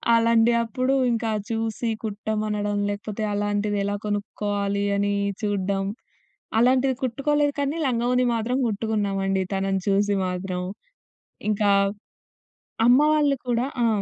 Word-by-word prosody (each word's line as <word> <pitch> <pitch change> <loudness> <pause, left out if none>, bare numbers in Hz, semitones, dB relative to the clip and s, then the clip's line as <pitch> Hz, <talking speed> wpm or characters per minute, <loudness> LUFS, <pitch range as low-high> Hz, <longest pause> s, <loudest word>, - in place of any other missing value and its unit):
అలాంటి 230 0 +4
అప్పుడు 255 +3 -1 0.2
ఇంకా 230 -1 -1 0.2
చూసి 225 +1 -2
కుట్టమనడం 210 -1 -2
లేకపోతే 210 +1 -4
అలాంటిది 205 0 0
ఎలా 205 +1 -1
కొనుక్కోవాలి 205 -1 -2
అని 205 0 +1 0.3
చూడ్డం. 195 -2 -1 0.7
అలాంటిది 255 +2 +3
కుట్టుకోలేదు 290 +3 +1
కానీ 285 +3 -1
లంగా, 240 -2 0
ఓణి 250 0 +3
మాత్రం 230 +3 -1
కుట్టుకున్నామండి 200 -3 -1
తనను 195 0 0
చూసి 200 +1 +2
మాత్రం. 180 0 -3 0.9
ఇంకా 205 -1 +2 1.2
అమ్మ 250 +3 +7
వాళ్ళు 290 -2 +3
కూడా 240 0 +1 0.2
ఆ! - - +4
210 Hz, 110 wpm, -24 LUFS, 200-240 Hz, 1.2 s, అమ్మ